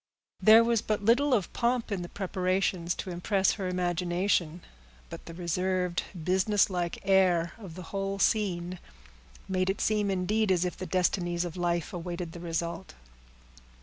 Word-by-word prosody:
There 220 +1 +8
was 230 -2 +2
but 210 -1 -2
little 265 +6 +4
of 210 -9 +1
pomp 240 -1 0
in 195 -3 -1
the 175 - -6
preparations, 185 -2 -1
to 185 - -5
impress 190 +2 +1
her 195 -3 -3
imagination; 180 -1 0 0.5
but - - -9
the 165 - -7
reserved, 180 +1 -1 0.2
businesslike 185 -1 +1
air 180 -3 +3
of 190 -7 -10
the 185 - -8
whole 195 0 -2
scene 185 -4 0 0.7
made 185 0 0
it 195 - -1
seem, 210 -2 +1
indeed, 195 +3 +1
as 180 -1 +2
if 180 - -3
the 185 - -6
destinies 175 0 0
of 170 - -6
life 175 -2 -1
awaited 175 -1 -5
the 170 - -9
result. 170 +2 -4
185 Hz, 150 wpm, -29 LUFS, 175-200 Hz, 0.7 s, There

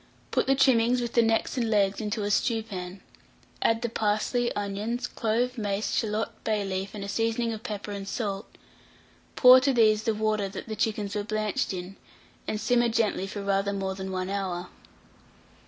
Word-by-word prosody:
Put - - +1
the 270 - +4
trimmings, 250 -2 +4
with 240 -1 -3
the 235 - +5
necks 225 +3 +1
and 235 -3 0
legs, 200 -1 +2
into 210 0 -2
a 205 - -1
stewpan; 205 -6 -1 0.6
add 225 +1 +2
the - - +1
parsley, 220 +2 0
onions, 205 +4 -2
clove, 240 +2 -1
mace, 205 0 -1
shalot, 215 0 -2
bay 215 -2 0
leaf, 190 +1 -3
and 205 - -5
a - - -5
seasoning 230 +2 0
of 215 - -7
pepper 210 -3 -5
and 200 -1 -5
salt; 200 -1 -3 0.9
pour 255 0 +9
to 275 +2 +2
these 215 -4 +4
the 220 0 0
water 215 -2 0
that 195 - -8
the 220 - -4
chickens 210 -1 -1
were 210 - -1
blanched 215 0 -1
in, 185 +1 -6 0.5
and 215 - -2
simmer 240 +2 +2
gently 220 -4 0
for 205 0 -6
rather 200 0 +1
more 195 -1 -2
than 190 0 -6
1 185 0 -2
hour. 185 -3 -3
215 Hz, 180 wpm, -27 LUFS, 200-230 Hz, 0.9 s, pour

